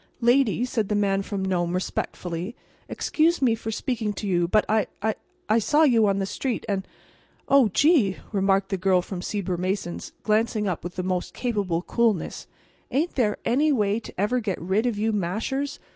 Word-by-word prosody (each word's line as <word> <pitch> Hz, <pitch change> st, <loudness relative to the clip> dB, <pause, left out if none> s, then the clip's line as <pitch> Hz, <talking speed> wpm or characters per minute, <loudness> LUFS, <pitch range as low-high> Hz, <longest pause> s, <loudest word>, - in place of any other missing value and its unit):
"Lady," 240 Hz, -1 st, +3 dB
said 220 Hz, -5 st, -2 dB
the 210 Hz, -, +1 dB
Man 195 Hz, -1 st, +2 dB
from 195 Hz, -1 st, -3 dB
Nome, 175 Hz, -2 st, 0 dB
respectfully, 180 Hz, +2 st, -3 dB, 0.3 s
"excuse 330 Hz, +2 st, +1 dB
me 250 Hz, -4 st, +3 dB
for 225 Hz, 0 st, -5 dB
speaking 220 Hz, -2 st, -2 dB
to 205 Hz, -, -6 dB
you, 175 Hz, -2 st, +2 dB
but 210 Hz, +4 st, +3 dB
I—I—I 220 Hz, -, -1 dB
saw 295 Hz, +8 st, +3 dB
you 230 Hz, -7 st, +5 dB
on 195 Hz, -1 st, +2 dB
the 195 Hz, -, 0 dB
street, 245 Hz, +5 st, -3 dB
and—and—" 195 Hz, -2 st, -2 dB, 0.6 s
"Oh, 275 Hz, -4 st, +5 dB
gee!" 270 Hz, -, +3 dB
remarked 195 Hz, -1 st, +2 dB
the 195 Hz, -, -1 dB
Girl 185 Hz, -1 st, +3 dB
from 185 Hz, -1 st, -6 dB
Sieber 185 Hz, -2 st, -2 dB
Mason's, 185 Hz, 0 st, -3 dB
glancing 215 Hz, 0 st, +1 dB
up 180 Hz, -4 st, -2 dB
with 175 Hz, +1 st, -6 dB
the 185 Hz, -, -2 dB
most 180 Hz, -1 st, -2 dB
capable 200 Hz, -8 st, -1 dB
coolness. 225 Hz, -5 st, 0 dB, 0.4 s
"Ain't 300 Hz, +7 st, 0 dB
there 215 Hz, -6 st, +1 dB
any 290 Hz, +6 st, +3 dB
way 210 Hz, -4 st, +1 dB
to 230 Hz, -, -10 dB
ever 220 Hz, +6 st, +1 dB
get 205 Hz, -5 st, -3 dB
rid 195 Hz, +7 st, 0 dB
of 230 Hz, -4 st, -1 dB
you 220 Hz, +2 st, +1 dB
mashers? 220 Hz, +9 st, -2 dB
210 Hz, 175 wpm, -25 LUFS, 190-240 Hz, 0.6 s, you